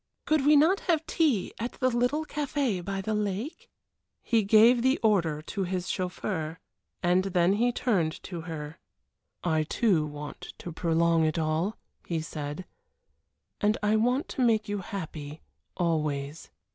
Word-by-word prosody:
Could 305 Hz, -2 st, +2 dB
we 300 Hz, -, +7 dB
not 325 Hz, +7 st, +5 dB
have 325 Hz, -3 st, 0 dB
tea 280 Hz, -, +1 dB
at 235 Hz, +2 st, -3 dB
the 255 Hz, -1 st, +1 dB
little 245 Hz, +6 st, +1 dB
café 280 Hz, -10 st, -1 dB
by 195 Hz, +1 st, -3 dB
the 215 Hz, +3 st, -2 dB
lake?" 210 Hz, -, -3 dB, 0.5 s
He 230 Hz, -1 st, +3 dB
gave 220 Hz, +4 st, +6 dB
the 260 Hz, +2 st, +3 dB
order 170 Hz, -8 st, +2 dB
to 195 Hz, +4 st, -3 dB
his 185 Hz, 0 st, -3 dB
chauffeur, 180 Hz, -3 st, -3 dB, 0.5 s
and 180 Hz, +2 st, +3 dB
then 180 Hz, -1 st, +3 dB
he 240 Hz, +4 st, +2 dB
turned 190 Hz, -11 st, +1 dB
to 175 Hz, -3 st, -6 dB
her. 160 Hz, -2 st, -7 dB, 0.6 s
"I, 160 Hz, -3 st, +2 dB
too, 160 Hz, -1 st, +1 dB
want 150 Hz, 0 st, -8 dB
to 175 Hz, -, -7 dB
prolong 165 Hz, 0 st, +2 dB
it 155 Hz, +1 st, +1 dB
all," 160 Hz, +6 st, 0 dB, 0.3 s
he 165 Hz, -2 st, -2 dB
said, 150 Hz, +2 st, -5 dB, 0.9 s
"and 210 Hz, +1 st, +2 dB
I 210 Hz, +1 st, +3 dB
want 245 Hz, +6 st, +1 dB
to -, -, -3 dB
make 220 Hz, -3 st, +3 dB
you 205 Hz, 0 st, -2 dB
happy 160 Hz, -5 st, -6 dB, 0.4 s
always." 155 Hz, -3 st, -1 dB
190 Hz, 150 wpm, -28 LUFS, 160-235 Hz, 0.9 s, we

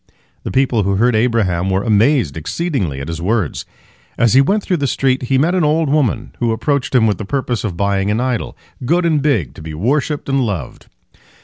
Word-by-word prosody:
The -, -, -5 dB
people 130 Hz, -4 st, +2 dB
who 100 Hz, 0 st, 0 dB
heard 120 Hz, +3 st, +2 dB
Abraham 105 Hz, -6 st, +1 dB
were 95 Hz, +1 st, 0 dB
amazed 110 Hz, -, +2 dB
exceedingly 90 Hz, -, -3 dB
at 70 Hz, -, -6 dB
his 85 Hz, 0 st, -5 dB
words. 100 Hz, -3 st, -1 dB, 0.5 s
As 120 Hz, -2 st, +3 dB
he 135 Hz, -, +7 dB
went 200 Hz, +9 st, +1 dB
through 180 Hz, -, 0 dB
the 140 Hz, -2 st, -1 dB
streets, 130 Hz, -1 st, 0 dB
he 135 Hz, -, +2 dB
met 160 Hz, +7 st, +2 dB
an 185 Hz, -2 st, +1 dB
old 155 Hz, 0 st, +1 dB
woman 135 Hz, -4 st, 0 dB
who 115 Hz, -2 st, +1 dB
approached 140 Hz, +3 st, -1 dB
him 120 Hz, -3 st, +5 dB
with 105 Hz, -2 st, 0 dB
the -, -, -4 dB
purpose 125 Hz, 0 st, -2 dB
of 90 Hz, -6 st, -4 dB
buying 100 Hz, 0 st, 0 dB
an 105 Hz, +2 st, 0 dB
idol, 125 Hz, -2 st, -2 dB, 0.3 s
good 170 Hz, +7 st, +1 dB
and 155 Hz, -3 st, +2 dB
big, 125 Hz, -, 0 dB
to -, -, -12 dB
be 80 Hz, -1 st, -7 dB
worshipped 140 Hz, -, -1 dB
and 135 Hz, -1 st, +1 dB
loved. 95 Hz, -, -5 dB
120 Hz, 210 wpm, -17 LUFS, 100-140 Hz, 0.5 s, he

